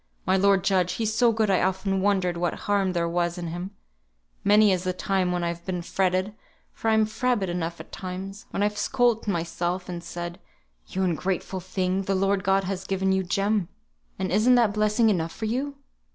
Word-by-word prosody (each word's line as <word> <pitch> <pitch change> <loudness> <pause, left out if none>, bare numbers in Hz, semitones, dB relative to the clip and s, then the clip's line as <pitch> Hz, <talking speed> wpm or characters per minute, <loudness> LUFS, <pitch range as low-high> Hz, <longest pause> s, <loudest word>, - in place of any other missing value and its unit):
My 190 - +3
lord 195 -1 +4
judge, 180 -2 +2
he's 220 +1 -1
so 235 +1 +4
good 220 -2 +1
I 185 - +3
often 190 +1 0
wondered 190 -3 +1
what 175 0 -1
harm 200 -2 +1
there 170 -1 0
was 175 +1 -1
in 170 -1 -4
him; 175 +3 -5 0.7
many 210 0 +5
is 185 -1 0
the 185 -1 -1
time 185 0 0
when 175 -1 -1
I've 170 0 -3
been 180 -1 -3
fretted 185 +2 0 0.4
(for 225 - -2
I'm 220 -1 +4
frabbit 220 -2 0
enough 170 -1 -3
at - - -11
times), 190 +2 -7
when 200 - -1
I've 210 0 0
scold't 240 -4 +1
myself, 175 0 -2
and 175 -1 -6
said, 175 0 -6 0.5
'You 190 - -2
ungrateful 185 +1 -1
thing, 185 +1 -1
the 195 0 -1
Lord 195 0 +1
God 195 0 +2
has 190 0 -3
given 190 0 +1
you 190 0 +2
Jem, 200 +1 0 0.5
and 190 - -2
isn't 225 +6 +5
that 230 -4 +3
blessing 215 +1 +3
enough 165 -4 -1
for 225 - -4
you?' 265 +6 -2
190 Hz, 195 wpm, -26 LUFS, 180-210 Hz, 0.7 s, many